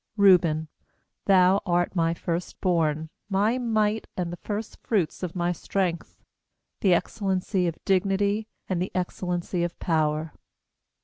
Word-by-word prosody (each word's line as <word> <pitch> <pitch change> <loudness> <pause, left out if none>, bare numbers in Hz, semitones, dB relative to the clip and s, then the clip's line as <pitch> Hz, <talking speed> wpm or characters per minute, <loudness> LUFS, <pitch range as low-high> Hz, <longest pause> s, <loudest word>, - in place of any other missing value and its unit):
3Reuben, 170 -6 +5 0.6
thou 190 0 +5
art 175 -1 0
my 165 -1 +2
first 170 0 -4
born, 160 -3 +1 0.2
My 210 +5 +2
might, 220 -2 +1
and 175 -2 -2
the - - -6
first 210 +4 -5
fruits 190 -9 0
of 180 -2 -4
my 175 0 +1
strength; 175 -1 -3 0.6
The 185 -3 +4
excellency 190 -1 0
of 165 - -3
dignity, 200 +3 +1 0.2
and 180 -2 -1
the 185 - -2
excellency 180 -1 -2
of 175 0 -3
power. 155 -1 0
180 Hz, 130 wpm, -26 LUFS, 170-200 Hz, 0.6 s, 3Reuben